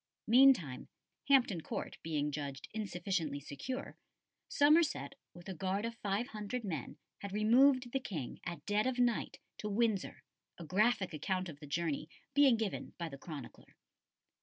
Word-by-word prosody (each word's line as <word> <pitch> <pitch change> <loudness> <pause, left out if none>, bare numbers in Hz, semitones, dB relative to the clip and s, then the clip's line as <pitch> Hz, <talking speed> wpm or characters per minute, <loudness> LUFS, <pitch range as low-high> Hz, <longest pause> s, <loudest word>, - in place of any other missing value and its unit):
Meantime, 235 - +5 0.4
Hampton 245 -11 +4
Court - - -5
being 150 -2 -1
judged 140 -2 -5
insufficiently 180 -7 -2
secure, 240 - -6 0.5
Somerset, 300 0 +3 0.2
with 175 0 -12
a 190 - -4
guard 190 +4 -1
of 230 - -3
five 205 +5 -1
hundred 215 +2 -4
men, 160 - -4 0.2
had 200 - -6
removed 245 +5 +4
the 270 - 0
King, 160 - -5
at 175 -1 -6
dead 210 +3 +1
of 260 -1 -1
night, 245 -2 +1 0.2
to 210 - -3
Windsor, 215 -2 0 0.3
a 170 - -8
graphic 200 +1 +2
account 185 +4 -2
of 145 -3 -10
the 150 - -10
journey 155 0 -2 0.2
being 275 -4 +6
given 220 -3 -3
by 170 -2 -4
the 140 - -9
chronicler. 145 -6 -9
200 Hz, 150 wpm, -34 LUFS, 160-240 Hz, 0.5 s, being